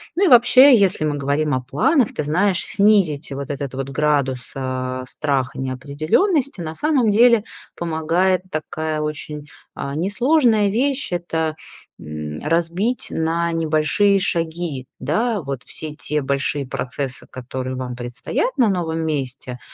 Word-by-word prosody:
Ну 390 +4 +3
и - - +4
вообще, 255 +3 +8
если 195 -7 +3
мы 150 -1 0
говорим 145 +2 0
о 130 - 0
планах, 200 - +1
ты - - -2
знаешь, 180 +5 +1
снизить 195 -9 +2
вот 140 +1 -6
этот 140 -2 -4
вот 135 +1 -4
градус, 135 -3 0
а, 130 -1 -3
страха 135 -3 -2
неопределенности. 150 - +1 0.2
На 160 -1 -5
самом 280 - +2
деле, 230 +1 +5 0.3
помогает 170 +3 0
такая, 155 0 -3
очень, 150 -1 -4 0.3
а, 140 0 -4
несложная 220 - +2
вещь- 265 +3 0
это, 160 -2 -2 0.4
м, 75 0 -6
разбить 170 +9 0
на 165 +1 0
небольшие 165 +5 +2
шаги, 165 -7 -2
да, 225 -2 0
вот 140 -4 -5
все 155 -1 -7
те 150 0 -2
большие 140 +1 -1
процессы, 130 +1 -5
которые 130 0 -5
вам 125 -1 -5
предстоят 125 - -3
на 240 -4 +4
новом 165 -4 -1
месте. 130 -4 -4
155 Hz, 135 wpm, -21 LUFS, 135-200 Hz, 0.4 s, вообще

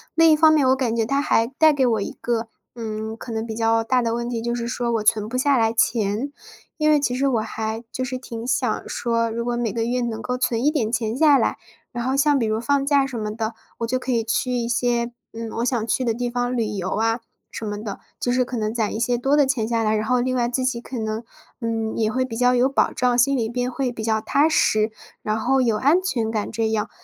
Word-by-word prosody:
另 330 -1 +6
一 - - +6
方 315 +1 +6
面， 300 -4 +4
我 260 - +5
感 250 -4 -1
觉 225 -1 +1
它 275 +5 +1
还 225 -5 +2
带 310 +5 +4
给 270 -2 +2
我 225 -3 +1
一 - - -3
个， 235 -1 -1 0.3
嗯， 220 -1 -5
可 230 - -8
能 220 0 -2
比 220 -1 -5
较 225 0 +2
大 250 +2 +2
的 230 -1 0
问 235 0 -2
题， 235 -2 -3
就 235 +1 -2
是 235 -1 -3
说 240 0 -2
我 225 -2 0
存 215 -1 +2
不 255 - -2
下 275 +1 +3
来 225 -1 +3
钱。 225 +3 +1 0.5
因 305 -1 +3
为 300 - +5
其 250 -3 0
实 270 +2 0
我 240 -4 +1
还 220 +1 -4
就 255 - -4
是 255 0 -3
挺 230 -2 -7
想 245 -2 -1
说 230 -1 0
如 235 +1 -3
果 240 0 -1
每 240 -3 -1
个 225 +2 -1
月 250 +1 0
能 225 -2 -3
够 250 +2 -2
存 235 -2 0
一 - - +6
点 250 -8 -1
钱 230 -1 -1
下 295 -1 +6
来， - - +1 0.4
然 240 0 -3
后 260 +2 0
像 290 0 +4
比 240 - +1
如 215 0 0
放 275 +3 +1
假 280 -1 +3
什 260 -3 -6
么 210 -1 -3
的， 220 0 -3 0.3
我 230 - -1
就 255 +2 0
可 255 0 -4
以 230 -2 +1
去 240 +3 0
一 240 -2 -1
些， 240 0 0 0.2
嗯， 230 0 -6
我 - - 0
想 240 -3 0
去 255 - +1
的 235 -2 +1
地 245 +1 -2
方 245 +1 -1
旅 230 - +1
游 190 -3 -3
啊 225 +2 0 0.3
什 225 - -6
么 205 0 -4
的， 205 -3 -6 0.2
就 - - -1
是 250 +1 +3
可 250 0 -5
能 215 0 -1
攒 225 -3 -1
一 220 - -3
些 240 +1 +1
多 270 +4 +2
的 290 - +5
钱 260 -5 0
下 230 0 0
来。 215 0 +2
然 215 0 -1
后 250 +2 +2
另 255 +1 0
外 240 -1 +1
自 255 +1 -1
己 240 -2 -1
可 250 -1 -6
能， 220 +1 -3 0.4
嗯， 225 -1 -2
也 220 -1 +1
会 255 +2 0
比 240 -3 -6
较 250 +2 +3
有 250 +1 +4
保 275 - +1
障， 250 -1 +1
心 275 +3 +3
里 230 -3 0
边 245 +2 -2
会 265 0 -1
比 225 - -6
较 220 0 +1
踏 285 +7 +2
实， 215 -8 +2 0.3
然 215 +1 -1
后 265 +4 +2
有 230 -4 +2
安 295 +10 +3
全 240 -12 -1
感 215 -2 -2
这 225 +1 0
样。 215 -1 -1
235 Hz, 290 characters per minute, -22 LUFS, 225-255 Hz, 0.5 s, 另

